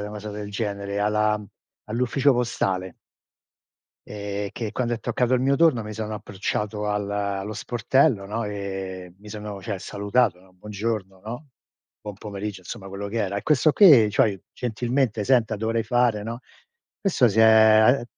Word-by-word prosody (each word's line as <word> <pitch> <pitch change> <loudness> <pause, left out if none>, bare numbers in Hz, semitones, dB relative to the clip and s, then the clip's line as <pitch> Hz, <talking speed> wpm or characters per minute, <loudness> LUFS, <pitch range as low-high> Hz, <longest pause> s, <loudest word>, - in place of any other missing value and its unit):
una 105 0 -5
cosa 105 0 -7
del 105 0 -6
genere 100 -1 -3
alla 105 0 +1 0.4
all'ufficio 125 +5 +2
postale. 95 -7 -1 1.1
Ehm, 100 -1 -4
che 110 -3 -5
quando 120 -2 -1
è 115 - -6
toccato 125 +1 -1
il 125 - +2
mio 135 +2 +2
turno 140 -7 +3
mi 105 - -6
sono 110 0 -4
approcciato 105 +1 -3
al 105 -1 -1
allo 100 0 -2
sportello, 120 +1 +1
no, 110 +3 -3
ehm, 95 -3 -6
mi 105 +1 -14
sono 105 -2 -7
cioè 100 -4 -4
salutato, 100 +1 0
no: 95 0 -22
"Buongiorno", 100 0 -4
no; 120 +6 -8 0.5
buon 105 -1 -7
pomeriggio, 100 -1 -6
insomma, 95 +1 -8
quello 100 +1 -6
che 110 +3 -3
era, 100 -2 -1
e - - -3
questo 150 0 +4
qui 140 - +7
cioè: 100 -1 +1
"Gentilmente, 120 -1 -1
senta 120 -1 +2
dovrei 115 +2 -1
fare" 120 -3 +1
no? 115 +2 -5 0.6
Questo 170 - +3
si 110 +1 -2
è 110 +3 +6
105 Hz, 160 wpm, -24 LUFS, 100-120 Hz, 1.1 s, qui